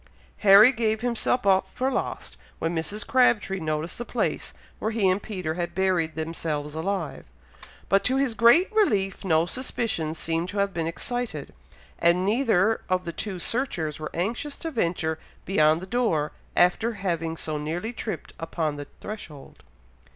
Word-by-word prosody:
Harry 205 Hz, +4 st, +8 dB
gave 220 Hz, -3 st, 0 dB
himself 245 Hz, 0 st, +1 dB
up 190 Hz, -1 st, +4 dB
for 260 Hz, +1 st, -1 dB
lost -, -, -3 dB, 0.2 s
when 165 Hz, +1 st, -2 dB
Mrs. 200 Hz, +6 st, -2 dB
Crabtree 215 Hz, -7 st, +3 dB
noticed 155 Hz, +2 st, -3 dB
the -, -, -2 dB
place -, -, -2 dB, 0.2 s
where 220 Hz, -, -1 dB
he 220 Hz, -3 st, +1 dB
and 185 Hz, +2 st, +2 dB
Peter 185 Hz, -7 st, -4 dB
had 170 Hz, 0 st, -4 dB
buried 180 Hz, -4 st, +1 dB
themselves 155 Hz, -2 st, -3 dB
alive; 190 Hz, +5 st, -3 dB, 0.6 s
but 195 Hz, 0 st, +3 dB
to 255 Hz, -, +3 dB
his 270 Hz, -3 st, +1 dB
great 240 Hz, -, +5 dB
relief, 205 Hz, -, +1 dB
no 165 Hz, -3 st, +3 dB
suspicion 215 Hz, -8 st, -2 dB
seemed 165 Hz, +2 st, -2 dB
to 205 Hz, -, -5 dB
have 200 Hz, -1 st, +1 dB
been 165 Hz, -1 st, -1 dB
excited, 245 Hz, +8 st, -4 dB, 0.5 s
and 175 Hz, +2 st, +3 dB
neither 220 Hz, -2 st, +2 dB
of 185 Hz, 0 st, +1 dB
the 170 Hz, -, -4 dB
two 195 Hz, 0 st, -4 dB
searchers 175 Hz, -, -1 dB
were 155 Hz, -, -4 dB
anxious 235 Hz, -, -2 dB
to 325 Hz, -, -5 dB
venture 170 Hz, -, -1 dB, 0.3 s
beyond 155 Hz, -3 st, +3 dB
the -, -, -6 dB
door, 190 Hz, -9 st, 0 dB, 0.3 s
after 200 Hz, +6 st, +3 dB
having 165 Hz, -5 st, -2 dB
so 155 Hz, -2 st, -3 dB
nearly 175 Hz, +10 st, -3 dB
tripped 220 Hz, -2 st, -5 dB
upon 160 Hz, -2 st, -2 dB
the 145 Hz, -1 st, -7 dB
threshold. 170 Hz, -10 st, -9 dB
190 Hz, 160 wpm, -26 LUFS, 165-225 Hz, 0.6 s, Harry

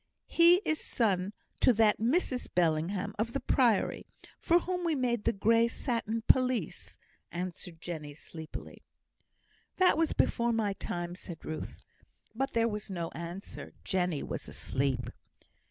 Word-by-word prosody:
"He 345 Hz, +3 st, +6 dB
is 315 Hz, -, 0 dB
son 195 Hz, -5 st, +1 dB, 0.3 s
to -, -, +6 dB
that 215 Hz, -1 st, +4 dB
Mrs 250 Hz, +2 st, +1 dB
Bellingham 180 Hz, +4 st, +1 dB
of 230 Hz, +2 st, -1 dB
the 275 Hz, -, 0 dB
Priory, 240 Hz, -8 st, +2 dB, 0.3 s
for 340 Hz, -, +4 dB
whom 360 Hz, 0 st, -2 dB
we 330 Hz, -2 st, +1 dB
made 240 Hz, -4 st, 0 dB
the -, -, +4 dB
grey 230 Hz, +3 st, +3 dB
satin 230 Hz, -2 st, -2 dB
pelisse," 255 Hz, -1 st, +1 dB, 0.3 s
answered 175 Hz, -1 st, -5 dB
Jenny, 155 Hz, -4 st, -6 dB
sleepily. 160 Hz, 0 st, -9 dB, 0.9 s
"That 365 Hz, -4 st, +4 dB
was 330 Hz, -, +2 dB
before 235 Hz, 0 st, +2 dB
my 215 Hz, -3 st, +1 dB
time," 175 Hz, -2 st, -4 dB
said 175 Hz, -2 st, -9 dB
Ruth. 155 Hz, -, -6 dB, 0.5 s
But 270 Hz, +4 st, -2 dB
there 230 Hz, 0 st, +3 dB
was 210 Hz, -2 st, -4 dB
no 170 Hz, -3 st, -3 dB
answer. 170 Hz, +4 st, -7 dB
Jenny 180 Hz, -5 st, 0 dB
was -, -, -5 dB
asleep. 130 Hz, -2 st, -1 dB
210 Hz, 140 wpm, -31 LUFS, 175-245 Hz, 0.9 s, He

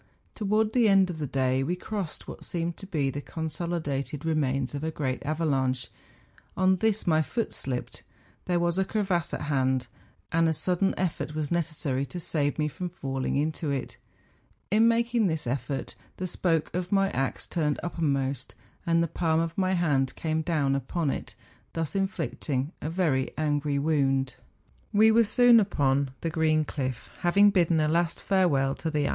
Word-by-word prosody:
Towards 215 Hz, +1 st, +1 dB
the 235 Hz, -4 st, +4 dB
end 195 Hz, -2 st, +5 dB
of 160 Hz, -, -7 dB
the 150 Hz, -, -2 dB
day 130 Hz, -1 st, +1 dB
we 170 Hz, +7 st, 0 dB
crossed 190 Hz, -3 st, -5 dB
what -, -, -8 dB
seemed 170 Hz, -1 st, -2 dB
to 195 Hz, -, -9 dB
be 145 Hz, -7 st, 0 dB
the 145 Hz, -, -5 dB
consolidated 155 Hz, -3 st, -3 dB
re¬ 160 Hz, 0 st, 0 dB
mains 135 Hz, -3 st, 0 dB
of 145 Hz, +1 st, -4 dB
a 160 Hz, -, 0 dB
great 135 Hz, -5 st, -3 dB
avalanche; 135 Hz, -4 st, 0 dB, 0.7 s
on 185 Hz, 0 st, +4 dB
this 220 Hz, +2 st, +1 dB
my 160 Hz, -2 st, +3 dB
foot 230 Hz, +8 st, -2 dB
slipped; 125 Hz, -2 st, -4 dB, 0.4 s
there 175 Hz, -1 st, +1 dB
was 175 Hz, +1 st, +1 dB
a -, -, +4 dB
crevasse 190 Hz, -5 st, -1 dB
at -, -, -3 dB
hand, 130 Hz, -3 st, +1 dB, 0.5 s
and 165 Hz, 0 st, +3 dB
a -, -, +2 dB
sudden 180 Hz, +4 st, 0 dB
effott 170 Hz, -4 st, -2 dB
was 155 Hz, -2 st, -2 dB
necessary 155 Hz, -5 st, -1 dB
to 180 Hz, -, -6 dB
save 145 Hz, -3 st, -1 dB
me 150 Hz, -1 st, +1 dB
from 180 Hz, +4 st, -5 dB
falling 135 Hz, -6 st, -3 dB
into 155 Hz, +2 st, -1 dB
it. 135 Hz, -3 st, -3 dB, 0.7 s
In 220 Hz, +2 st, +5 dB
making 235 Hz, -1 st, +2 dB
this 160 Hz, -3 st, -2 dB
effort, 135 Hz, +1 st, -3 dB, 0.2 s
the 185 Hz, -, -3 dB
spoke 165 Hz, -3 st, 0 dB
of 180 Hz, 0 st, -3 dB
my 195 Hz, -1 st, +3 dB
axe 135 Hz, 0 st, -2 dB
turned 150 Hz, -4 st, -1 dB
uppermost, 140 Hz, -6 st, -1 dB, 0.3 s
and 165 Hz, 0 st, +3 dB
the -, -, 0 dB
palm 160 Hz, 0 st, +1 dB
of 165 Hz, 0 st, -2 dB
my 190 Hz, -1 st, +1 dB
hand 145 Hz, -7 st, +1 dB
came 160 Hz, -1 st, -1 dB
down 150 Hz, -4 st, +1 dB
upon 145 Hz, +2 st, -1 dB
it, -, -, -6 dB, 0.4 s
thus 165 Hz, +2 st, -2 dB
inflicting 160 Hz, -7 st, -2 dB
a 155 Hz, -, -3 dB
very 160 Hz, -7 st, +1 dB
angry 145 Hz, -1 st, 0 dB
wound. 135 Hz, -3 st, +1 dB, 0.6 s
We 220 Hz, +1 st, +6 dB
were 230 Hz, +1 st, +5 dB
soon 240 Hz, +2 st, +6 dB
upon 140 Hz, -9 st, +1 dB
the 165 Hz, -, -2 dB
green 155 Hz, -1 st, +2 dB
cliff, 130 Hz, -4 st, -4 dB
having 200 Hz, +4 st, +5 dB
bidden 170 Hz, -4 st, +3 dB
a 155 Hz, -, +2 dB
last 165 Hz, +1 st, +1 dB
farewell 150 Hz, -9 st, +2 dB
to -, -, -14 dB
the -, -, +2 dB
THE 150 Hz, -1 st, -1 dB
FINSTERAARHORN. 140 Hz, -, +1 dB
160 Hz, 180 wpm, -27 LUFS, 140-180 Hz, 0.7 s, We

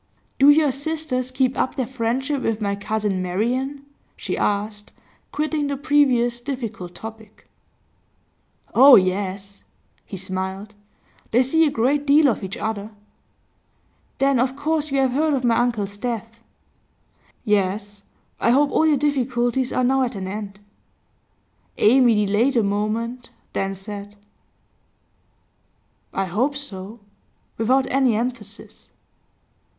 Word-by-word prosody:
'Do 275 Hz, +2 st, +7 dB
your 295 Hz, -1 st, +5 dB
sisters 280 Hz, -2 st, -2 dB
keep 255 Hz, 0 st, 0 dB
up -, -, -1 dB
their 260 Hz, -, -1 dB
friendship 260 Hz, +3 st, -2 dB
with 225 Hz, -3 st, -1 dB
my 200 Hz, -2 st, -1 dB
cousin 205 Hz, -2 st, -2 dB
Marian?' 250 Hz, +10 st, -2 dB, 0.3 s
she -, -, -3 dB
asked, 210 Hz, 0 st, -2 dB, 0.4 s
quitting 305 Hz, -1 st, -1 dB
the 280 Hz, -1 st, -2 dB
previous 255 Hz, -5 st, +2 dB
difficult 230 Hz, -10 st, -6 dB
topic. 220 Hz, +1 st, -11 dB, 1.3 s
'Oh 270 Hz, +3 st, +9 dB
yes!' 195 Hz, +1 st, -1 dB, 0.4 s
He 195 Hz, -, -8 dB
smiled. 190 Hz, +2 st, -4 dB, 0.6 s
'They 245 Hz, +3 st, +3 dB
see 320 Hz, +5 st, +3 dB
a -, -, +2 dB
great 280 Hz, +3 st, 0 dB
deal 290 Hz, +1 st, +6 dB
of 225 Hz, -, -2 dB
each 190 Hz, 0 st, -5 dB
other.' 215 Hz, -1 st, -4 dB, 1.3 s
'Then 275 Hz, -2 st, +2 dB
of 255 Hz, +2 st, 0 dB
course 305 Hz, +1 st, -1 dB
you 275 Hz, -, -1 dB
have 260 Hz, -1 st, +2 dB
heard 300 Hz, +3 st, +1 dB
of 260 Hz, -, -2 dB
my 235 Hz, -2 st, +3 dB
uncle's 215 Hz, -4 st, -1 dB
death?' 230 Hz, 0 st, -5 dB, 1.1 s
'Yes. 205 Hz, 0 st, -1 dB, 0.4 s
I -, -, +2 dB
hope 280 Hz, +4 st, +3 dB
all 320 Hz, -, +3 dB
your 300 Hz, -2 st, +3 dB
difficulties 260 Hz, -3 st, 0 dB
are 255 Hz, -, 0 dB
now 265 Hz, +2 st, +2 dB
at 250 Hz, -2 st, -1 dB
an 190 Hz, -1 st, -5 dB
end.' 200 Hz, 0 st, -6 dB, 1.2 s
Amy 230 Hz, -2 st, +4 dB
delayed 225 Hz, +7 st, +1 dB
a 230 Hz, -, +3 dB
moment, 225 Hz, +4 st, -2 dB, 0.2 s
then 195 Hz, 0 st, -2 dB
said: 205 Hz, +1 st, -8 dB, 2.0 s
'I 195 Hz, -, -1 dB
hope 240 Hz, +11 st, 0 dB
so,' 215 Hz, -5 st, -6 dB, 0.6 s
without 260 Hz, +4 st, +2 dB
any 260 Hz, -3 st, +3 dB
emphasis. 230 Hz, -3 st, -5 dB
235 Hz, 125 wpm, -22 LUFS, 205-270 Hz, 2.0 s, Oh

